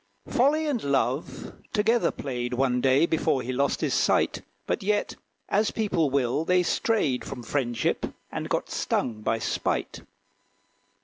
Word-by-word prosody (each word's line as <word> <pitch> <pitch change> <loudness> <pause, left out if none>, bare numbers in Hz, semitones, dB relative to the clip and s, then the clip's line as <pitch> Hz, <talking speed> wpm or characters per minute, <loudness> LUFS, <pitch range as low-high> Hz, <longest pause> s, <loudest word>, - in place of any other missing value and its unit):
Folly 290 +6 +2
and 280 -7 -1
Love 135 0 -1 0.2
together 225 +2 +3
played, 125 -2 -4
One 125 -1 +1
day, 135 +4 +4
before 160 -5 +1
he 130 - -3
lost 140 +2 0
his - - 0
sight; - - +2 0.2
But - - -1
yet, 205 +1 0 0.3
as 210 +1 +2
people 180 -9 0
will, 135 +2 +1
they 180 +1 +3
strayed 170 - +1
From 125 - -7
friendship, 120 -2 -1 0.2
and - - -4
got - - -1
stung 110 -3 -1
by 115 - 0
spite. 110 - -2
140 Hz, 140 wpm, -26 LUFS, 125-205 Hz, 0.3 s, day